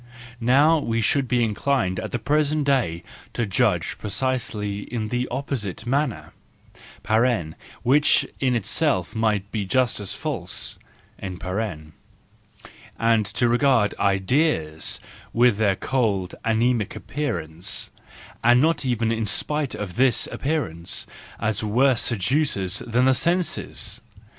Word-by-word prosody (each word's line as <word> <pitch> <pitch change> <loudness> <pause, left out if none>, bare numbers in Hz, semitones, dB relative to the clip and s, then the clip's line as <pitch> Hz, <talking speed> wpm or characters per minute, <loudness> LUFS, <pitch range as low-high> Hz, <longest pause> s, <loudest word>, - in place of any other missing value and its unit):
— 115 0 -19 0.2
Now 160 +2 +5
we 115 -5 -1
should 130 +4 +1
be 120 -1 +2
inclined 110 -3 0
at - - -5
the - - -1
present 150 +4 +1
day 95 -12 +1 0.3
to 120 - -1
judge 100 - 0
precisely 105 -2 -2
in 110 -3 -3
the 125 +1 -1
opposite 120 -7 -4
manner 135 0 -1 1.5
(which 145 +4 +4
in 130 -2 +1
itself 110 - +1
might 105 -3 0
be 105 -3 -2
just 125 +5 +1
as 100 -2 -5
false), - - -3 0.4
and 95 -2 -6
to 105 +5 -3
regard 120 -3 +3
ideas, 95 - +1 0.3
with 120 -2 +4
their 100 -3 +2
cold, 100 -7 -1
anaemic 115 -1 +1
appearance, 90 - -2 0.5
and 120 +1 +6
not 160 +3 +2
even 115 -3 0
in 110 -1 -1
spite 150 +5 +2
of 100 -1 -6
this 125 -2 +3
appearance, 135 - -2 0.3
as 110 0 -1
worse 120 +4 +3
seducers 115 - 0
than 120 +2 +2
the 130 - +5
senses. 175 +5 -1
115 Hz, 120 wpm, -23 LUFS, 100-135 Hz, 1.5 s, and